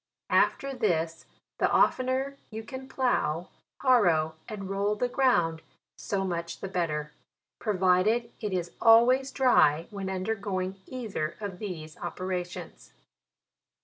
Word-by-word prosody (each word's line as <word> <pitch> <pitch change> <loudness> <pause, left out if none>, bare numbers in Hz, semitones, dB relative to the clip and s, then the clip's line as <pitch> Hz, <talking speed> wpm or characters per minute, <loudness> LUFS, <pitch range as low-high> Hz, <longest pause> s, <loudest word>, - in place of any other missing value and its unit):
After 275 0 +2
this, 165 -9 -1 0.3
the - - +3
oftener 260 +2 +2
you 220 0 -6
can 260 +2 -8
plough, 175 - 0 0.3
harrow, 175 - +4 0.2
and 200 -3 -6
roll 200 +2 0
the 245 +4 0
ground, 175 -12 +2 0.3
so 195 -1 -2
much 170 -2 -4
the - - -4
better: 155 -5 -2 0.5
provided 210 +3 +2
it 210 -2 -2
is 175 -2 -2
always 250 +4 +6
dry 170 - +4
when 195 -2 -4
un 185 -1 -3
dergoing 195 -3 -2
either 215 -11 -4
of 200 -4 -6
these 160 -7 -6
operations. 180 0 -5
195 Hz, 120 wpm, -28 LUFS, 175-235 Hz, 0.5 s, always